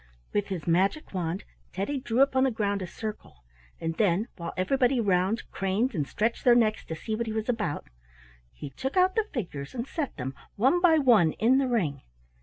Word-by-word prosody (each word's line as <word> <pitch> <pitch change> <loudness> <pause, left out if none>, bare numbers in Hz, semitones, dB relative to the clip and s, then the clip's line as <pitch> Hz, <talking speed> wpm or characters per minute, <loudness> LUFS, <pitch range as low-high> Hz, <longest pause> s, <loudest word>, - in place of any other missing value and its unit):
With 205 -1 0
his 180 -6 -4
magic 190 - +1
wand, 180 +1 -2 0.3
Teddy 235 +9 -2
drew 240 0 0
upon 265 -1 +2
the 265 - +4
ground 205 -4 -1
a 185 - -4
circle, 210 - -8 0.4
and 165 0 -2
then, 205 +2 +2
while 170 -2 -5
everybody 250 +7 +2
round 195 +1 +1
craned 200 +7 0
and 150 -7 -1
stretched 230 +2 -1
their 245 -1 +6
necks 220 -2 +2
to 160 - -5
see 215 +7 -5
what 230 +1 -2
he 220 - -3
was 220 0 -2
about, 210 -12 -1 0.7
he 145 - -9
took 265 - -4
out 370 0 +4
the 445 -2 0
figures 170 - -5
and 235 -1 -3
set 285 - -4
them, 130 0 -4 0.2
one 265 - +3
by 335 -3 +6
one, 230 - +5
in 250 +4 +3
the 270 - +1
ring. 165 - 0
215 Hz, 200 wpm, -27 LUFS, 180-255 Hz, 0.7 s, their